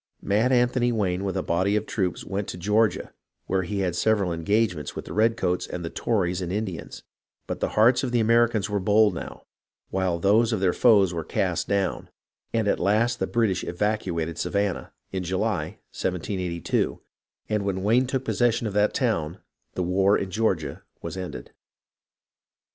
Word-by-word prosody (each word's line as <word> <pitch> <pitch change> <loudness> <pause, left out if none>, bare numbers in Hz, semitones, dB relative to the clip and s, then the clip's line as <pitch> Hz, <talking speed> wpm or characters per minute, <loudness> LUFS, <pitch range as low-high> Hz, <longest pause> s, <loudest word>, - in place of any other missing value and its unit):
Mad 110 +6 +2
Anthony 125 0 +3
Wayne 95 -4 0
with 95 -2 -2
a - - -1
body 95 +4 +1
of 105 - 0
troops 95 -6 -2
went 100 +1 -3
to - - -5
Georgia, 105 +3 +1 0.3
where 95 0 0
he 100 +2 -3
had 90 -3 -1
several 100 -1 +1
engagements 90 -1 0
with - - -6
the - - -7
red 115 +2 +2
coats 90 -4 -1
and 85 -1 -5
the 80 - -5
Tories 95 -5 0
and 90 -1 -3
Indians; 95 -4 -4 0.4
but - - -4
the - - 0
hearts 120 +4 +5
of 130 - -1
the 120 - +2
Americans 115 -2 +3
were 105 -1 -1
bold 105 +1 +4
now, 85 - -7 0.5
while 95 -2 0
those 105 +6 +3
of 110 - 0
their 95 -2 +2
foes 100 -7 +4
were 85 -1 -3
cast - - -1
down, 100 -1 -1 0.4
and 115 -2 0
at - - +1
last 115 +5 +2
the - - 0
British 110 -7 +1
evacuated 90 -4 -2
Savannah, 100 -2 -1 0.2
in 95 - -2
July, 90 +1 -2 0.2
1782, 90 -1 -2 0.5
and 105 -1 0
when 95 -1 -2
Wayne 120 +5 +3
took 130 0 -2
possession 120 -1 +1
of 105 - -3
that 105 +1 +2
town 95 - 0 0.4
the 90 - -1
war 95 +3 +3
in 95 - -4
Georgia 90 -9 -1 0.2
was - - -5
ended. 95 -1 -7
100 Hz, 175 wpm, -25 LUFS, 90-110 Hz, 0.5 s, hearts